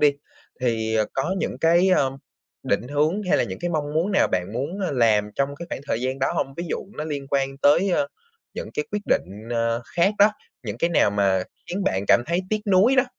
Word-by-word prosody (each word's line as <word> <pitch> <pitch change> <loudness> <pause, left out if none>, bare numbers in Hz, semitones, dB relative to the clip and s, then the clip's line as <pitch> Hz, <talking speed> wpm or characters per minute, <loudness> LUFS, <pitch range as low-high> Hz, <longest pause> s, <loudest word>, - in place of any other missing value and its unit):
đi. 145 -1 +5 0.5
Thì, 110 -2 0
à, 110 - +3
có 135 +8 -1
những - - -2
cái, 170 +3 +4
a, - - +4 0.6
định 120 - -1
hướng 155 +8 +1
hay 180 - +2
là - - +2
những - - -6
cái 175 +1 -2
mong 150 -3 -2
muốn 175 +6 +1
nào - - +3
bạn 90 +2 -1
muốn, 145 - -3
ơ, 185 - -1
làm 110 -4 +3
trong 140 +1 -1
cái 170 - -7
khoảng - - -5
thời 115 - -1
gian 130 +2 -2
đó 135 - 0
hông? 135 - -2
Ví 170 - -3
dụ - - 0 0.2
nó 150 - -3
liên 145 -3 -4
quan 135 -1 0
tới, 170 +8 +4
a, - - +2 0.5
những - - -6
cái 150 - -1
quyết 210 - -2
định, 105 +5 -1
ờ, 115 0 0
khác 190 +5 +3
đó, 205 +1 +6 0.3
những 105 -5 -5
cái 170 - +1
nào 125 -10 +3
mà 100 -2 +2 0.2
khiến 190 +3 -3
bạn 95 - 0
cảm 120 - +5
thấy 170 +2 +1
tiếc 215 -1 +1
nuối 200 +7 +4
đó? 255 - +5
145 Hz, 235 wpm, -23 LUFS, 115-175 Hz, 0.6 s, đó